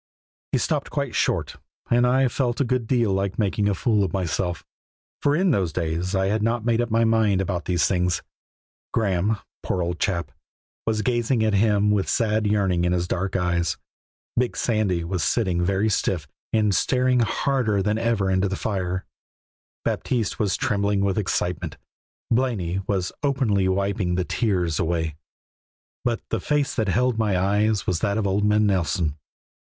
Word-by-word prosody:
He -, -, +2 dB
stopped -, -, -1 dB
quite -, -, -2 dB
short, -, -, 0 dB, 0.3 s
and 120 Hz, +1 st, +4 dB
I 130 Hz, +1 st, +3 dB
felt 125 Hz, +1 st, -1 dB
a -, -, +4 dB
good 125 Hz, -2 st, -1 dB
deal 120 Hz, -6 st, +2 dB
like 95 Hz, 0 st, -1 dB
making 105 Hz, -1 st, +1 dB
a 100 Hz, -, 0 dB
fool 105 Hz, +1 st, +2 dB
of 95 Hz, -, -1 dB
myself, 90 Hz, -2 st, -2 dB, 0.6 s
for 145 Hz, 0 st, +3 dB
in 185 Hz, +2 st, +3 dB
those 95 Hz, -, +1 dB
days 85 Hz, +3 st, -2 dB
I 95 Hz, 0 st, +2 dB
had 105 Hz, +3 st, 0 dB
not 115 Hz, +1 st, 0 dB
made 120 Hz, 0 st, +2 dB
up 120 Hz, -, -2 dB
my 115 Hz, +1 st, +3 dB
mind 110 Hz, -4 st, +3 dB
about 95 Hz, -2 st, -2 dB
these 90 Hz, -3 st, +2 dB
things. 90 Hz, -2 st, 0 dB, 0.7 s
Graeme, 105 Hz, 0 st, +1 dB, 0.2 s
poor 90 Hz, -, -1 dB
old 85 Hz, -1 st, -3 dB
chap, 85 Hz, -4 st, -1 dB, 0.6 s
was 110 Hz, -1 st, +1 dB
gazing 120 Hz, -1 st, +1 dB
at 110 Hz, -1 st, +2 dB
him 105 Hz, 0 st, +3 dB
with 100 Hz, -2 st, +1 dB
a -, -, -3 dB
sad 110 Hz, -2 st, +1 dB
yearning 95 Hz, -4 st, +1 dB
in 90 Hz, 0 st, +2 dB
his 90 Hz, -1 st, 0 dB
dark 95 Hz, +2 st, -2 dB
eyes; 90 Hz, -2 st, 0 dB, 0.6 s
big 125 Hz, 0 st, 0 dB
Sandy 105 Hz, -7 st, 0 dB
was 90 Hz, 0 st, -2 dB
sitting 95 Hz, -7 st, +1 dB
very 100 Hz, +3 st, +1 dB
stiff 90 Hz, -6 st, 0 dB, 0.2 s
and 105 Hz, -2 st, +2 dB
staring 125 Hz, +3 st, +2 dB
harder 115 Hz, -3 st, +1 dB
than 105 Hz, +2 st, 0 dB
ever 115 Hz, -4 st, +1 dB
into 95 Hz, +1 st, +2 dB
the 95 Hz, -, -2 dB
fire; 95 Hz, -3 st, -2 dB, 0.8 s
Baptiste 115 Hz, -5 st, -1 dB
was 100 Hz, -2 st, +1 dB
trembling 100 Hz, -1 st, +1 dB
with 100 Hz, 0 st, +1 dB
excitement; 90 Hz, -3 st, -2 dB, 0.5 s
Blaney 110 Hz, -8 st, 0 dB
was 95 Hz, -3 st, -1 dB
openly 130 Hz, -9 st, +1 dB
wiping 95 Hz, -1 st, 0 dB
the 90 Hz, 0 st, 0 dB
tears 90 Hz, -9 st, 0 dB
away, 80 Hz, -2 st, -1 dB, 0.9 s
but 120 Hz, -2 st, -1 dB
the 115 Hz, -, 0 dB
face 145 Hz, +7 st, 0 dB
that 110 Hz, -3 st, -1 dB
held 125 Hz, +3 st, +1 dB
my 105 Hz, -4 st, +2 dB
eyes 105 Hz, +2 st, +1 dB
was 90 Hz, -3 st, 0 dB
that 100 Hz, -1 st, 0 dB
of 110 Hz, -, 0 dB
old 100 Hz, +1 st, +1 dB
man 105 Hz, +1 st, +3 dB
Nelson. 85 Hz, -5 st, 0 dB
100 Hz, 170 wpm, -24 LUFS, 90-115 Hz, 0.9 s, and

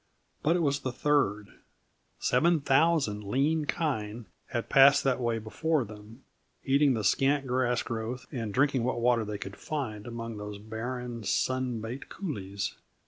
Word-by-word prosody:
But 165 Hz, +3 st, +3 dB
it 175 Hz, -, +1 dB
was 140 Hz, -1 st, +1 dB
the 130 Hz, -, -3 dB
third. 120 Hz, -7 st, +1 dB, 0.7 s
Seven 170 Hz, -1 st, +3 dB
thousand 135 Hz, -6 st, +2 dB
lean 145 Hz, +9 st, +1 dB
kine 115 Hz, -9 st, -2 dB, 0.2 s
had 120 Hz, -1 st, -3 dB
passed 140 Hz, +1 st, +7 dB
that 135 Hz, -2 st, +1 dB
way 120 Hz, -2 st, 0 dB
before 135 Hz, +6 st, 0 dB
them, 110 Hz, +4 st, -12 dB, 0.4 s
eating 140 Hz, -1 st, +4 dB
the 110 Hz, -, -2 dB
scant 135 Hz, +7 st, +2 dB
grass 125 Hz, -1 st, +1 dB
growth 115 Hz, +2 st, -4 dB
and 115 Hz, -7 st, -3 dB
drinking 135 Hz, +1 st, +2 dB
what 125 Hz, 0 st, 0 dB
water 120 Hz, -1 st, +3 dB
they 105 Hz, -1 st, -4 dB
could 95 Hz, 0 st, -7 dB
find 115 Hz, -9 st, -4 dB
among 115 Hz, -2 st, -5 dB
those 105 Hz, 0 st, -6 dB
barren, 115 Hz, +2 st, -5 dB
sun 130 Hz, +1 st, 0 dB
baked 120 Hz, +5 st, -6 dB
coulees. 100 Hz, -, -4 dB
125 Hz, 150 wpm, -29 LUFS, 110-140 Hz, 0.7 s, passed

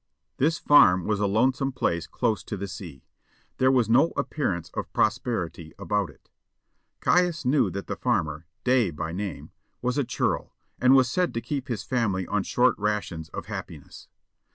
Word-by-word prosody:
This 155 Hz, +4 st, +2 dB
farm 90 Hz, -11 st, +5 dB
was 105 Hz, -2 st, 0 dB
a 105 Hz, -, +2 dB
lonesome 130 Hz, +6 st, +1 dB
place 85 Hz, -10 st, -1 dB
close 110 Hz, -, -1 dB
to 105 Hz, -, -4 dB
the 100 Hz, +1 st, -4 dB
sea; 85 Hz, -8 st, -9 dB, 0.5 s
there 130 Hz, -, +4 dB
was 125 Hz, -4 st, +3 dB
no 130 Hz, +9 st, +4 dB
appearance 90 Hz, -, -2 dB
of -, -, -5 dB
prosperity 85 Hz, -8 st, -1 dB
about 100 Hz, -1 st, -1 dB
it. -, -, -20 dB, 0.7 s
Caius 175 Hz, -5 st, +2 dB
knew 135 Hz, +3 st, +3 dB
that 100 Hz, -, -5 dB
the -, -, -4 dB
farmer, 75 Hz, +1 st, -1 dB, 0.2 s
Day 125 Hz, -5 st, +3 dB
by 80 Hz, +1 st, -5 dB
name, 95 Hz, -1 st, -5 dB, 0.3 s
was 125 Hz, +3 st, -1 dB
a -, -, +2 dB
churl, -, -, -2 dB, 0.2 s
and 130 Hz, +1 st, +6 dB
was 130 Hz, -2 st, +5 dB
said 180 Hz, +5 st, 0 dB
to -, -, +1 dB
keep 135 Hz, +3 st, -4 dB
his 120 Hz, -6 st, -3 dB
family 105 Hz, -7 st, 0 dB
on 105 Hz, +2 st, 0 dB
short 125 Hz, +6 st, +2 dB
rations 105 Hz, -7 st, -2 dB
of -, -, -7 dB
happiness. -, -, -8 dB
110 Hz, 170 wpm, -26 LUFS, 90-130 Hz, 0.7 s, and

